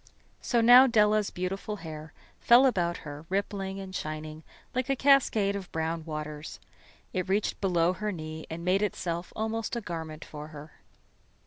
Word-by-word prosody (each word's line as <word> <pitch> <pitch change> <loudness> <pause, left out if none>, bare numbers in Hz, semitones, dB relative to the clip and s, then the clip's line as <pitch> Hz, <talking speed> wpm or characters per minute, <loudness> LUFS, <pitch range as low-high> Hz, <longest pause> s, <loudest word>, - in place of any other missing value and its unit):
So 240 -2 +1
now 245 +3 +9
Della's 215 -3 +3
beautiful 195 +3 -4
hair 155 -4 -8 0.3
fell 240 +3 +6
about 175 -9 +1
her, 150 +2 -8
rippling 195 0 -2
and 190 -1 -8
shining 155 0 -5 0.3
like 255 +1 -1
a 275 - +3
cascade 245 -8 +3
of 195 -3 -6
brown 160 0 -2
waters. 150 -1 -6 0.5
It 185 0 -2
reached 200 +2 0
below 175 -2 +2
her 210 +2 -3
knee 155 -3 -7
and 170 +1 -6
made 185 +2 +3
itself 175 -4 -2
almost 220 +1 -2
a - - -1
garment 160 -5 -6
for 150 0 -8
her. 150 0 -11
185 Hz, 155 wpm, -28 LUFS, 160-210 Hz, 0.5 s, now